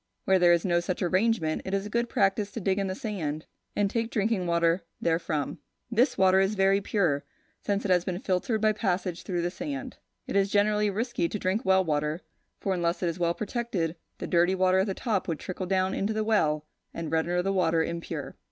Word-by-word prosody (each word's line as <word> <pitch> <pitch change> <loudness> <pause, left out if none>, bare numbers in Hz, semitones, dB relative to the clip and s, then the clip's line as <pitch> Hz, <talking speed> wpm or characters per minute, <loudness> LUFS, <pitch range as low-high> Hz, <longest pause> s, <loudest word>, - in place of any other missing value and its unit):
Where 190 -1 +4
there 175 -1 +6
is 170 +1 +3
no 175 -2 +3
such 180 +2 -2
arrangement, 185 -3 +1
it 190 - -2
is 195 0 -2
a - - -5
good 235 +1 0
practice 200 -2 +1
to - - -4
dig 195 -1 0
in 195 - 0
the 185 - -3
sand, 160 -9 -4 0.3
and 205 - +2
take 230 +2 -1
drinking 210 -4 0
water 170 +1 +2 0.2
therefrom. 165 -3 -1 0.3
This 235 +5 +2
water 190 0 +5
is 195 +2 +2
very 195 0 +3
pure, 175 -9 +1 0.4
since 200 0 -1
it 195 - +1
has 180 -1 +4
been 180 -1 -3
filtered 195 +4 -1
by 215 0 +4
passage 185 -4 -1
through 175 -3 -2
the 175 - -1
sand. 275 +3 -5 0.3
It - - -5
is 200 0 +3
generally 210 +1 +2
risky 220 -3 -1
to - - -3
drink 190 +2 -1
well 190 0 +4
water, 150 +1 -1 0.4
for 195 - -1
unless 175 0 -1
it 175 - +2
is 170 +2 -5
well 170 0 +1
protected, 205 -7 -2 0.2
the - - -5
dirty 175 +2 +3
water 185 0 +3
at 190 - +1
the 195 - -2
top 215 -6 -1
would 165 -3 -1
trickle 185 +2 -5
down 190 0 +1
into 205 +3 -1
the 215 0 0
well, 155 -9 +1 0.3
and 165 -2 -4
render 170 +2 +1
the 195 +1 0
water 165 -3 +2
impure. 170 +1 -5
190 Hz, 215 wpm, -28 LUFS, 170-205 Hz, 0.4 s, there